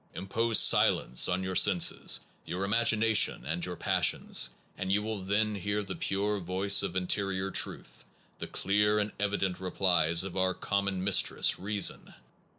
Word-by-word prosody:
Impose 110 +5 -1
silence 60 - +4
on 90 +1 -1
your 95 0 -4
senses, 95 -1 +2 0.2
your 90 +2 -5
imagination, 110 - +2
and 85 +4 -3
your 90 -1 -2
passions, - - 0 0.3
and 95 0 -4
you 105 +1 +1
will 110 -2 -5
then 105 +3 -1
hear 105 +1 -3
the 100 - -6
pure 100 +1 -2
voice 95 +3 +2
of 95 -2 -4
interior 95 +1 -1
truth, - - -4 0.4
the - - -6
clear 105 +2 0
and 105 0 -2
evident 100 -3 -2
replies 90 -3 +1
of 95 -1 -7
our 95 -1 0
common 100 -2 -2
mis 95 0 +4
tress - - +1
[reason]. 100 +2 -1
95 Hz, 155 wpm, -29 LUFS, 90-105 Hz, 0.4 s, silence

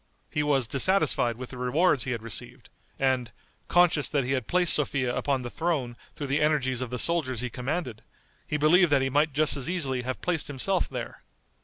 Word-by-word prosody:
He 150 - 0
was 140 -4 +2
dissatisfied 135 - +2
with 130 0 -8
the 125 - -9
rewards 140 +3 +2
he 130 - -3
had 115 -3 -4
received, 125 +2 -3 0.3
and, 130 -3 0 0.4
conscious 175 -4 +3
that 140 -3 0
he 125 - -3
had 130 -4 -1
placed 180 -1 +2
Sophia 130 -4 0
upon 135 -3 -1
the 120 - -5
throne 150 -8 -2 0.2
through 145 - -5
the 140 +2 0
energies 135 -5 +1
of 130 - -3
the 125 - -4
soldiers 135 -7 0
he 125 -1 -4
commanded, 125 -3 -4 0.5
he 150 - -1
believed 160 +3 +4
that 140 -2 +4
he 135 - -1
might 150 +3 +2
just 150 +2 +1
as 135 0 -3
easily 140 -8 -1
have 130 +1 -4
placed 175 -4 -1
himself 160 +7 -1
there. 125 -3 -7
135 Hz, 200 wpm, -27 LUFS, 125-155 Hz, 0.5 s, believed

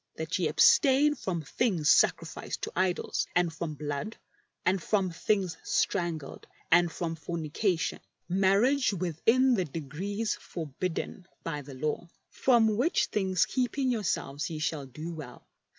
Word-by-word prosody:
That - - -3
ye - - +2
abstain 285 +1 +5
from 185 - -3
things 175 - 0
sacrificed - - +1
to - - -3
idols 185 -1 0
and 175 -2 +2
from 160 -2 -4
blood, 145 +8 -4 0.5
and 185 0 +2
from 190 -1 +1
things 185 0 0
strangled, 165 -5 -1 0.2
and 175 0 +5
from 165 -1 -3
fornication 165 +3 -2 0.3
(marriage 200 +8 +3
within 210 - +2
the 190 -6 +1
degrees 170 +9 -3
forbidden 170 +3 -5 0.2
by 150 -3 -3
the 140 -1 -10
Law); 155 +5 -3 0.2
from 225 -5 +3
which, 290 +9 +2
things 190 -3 +2
keeping 260 +1 0
yourselves 175 - -2
you 160 -2 -5
shall 155 -3 -2
do 155 +6 -7
well. 150 -6 -10
175 Hz, 135 wpm, -29 LUFS, 160-215 Hz, 0.5 s, abstain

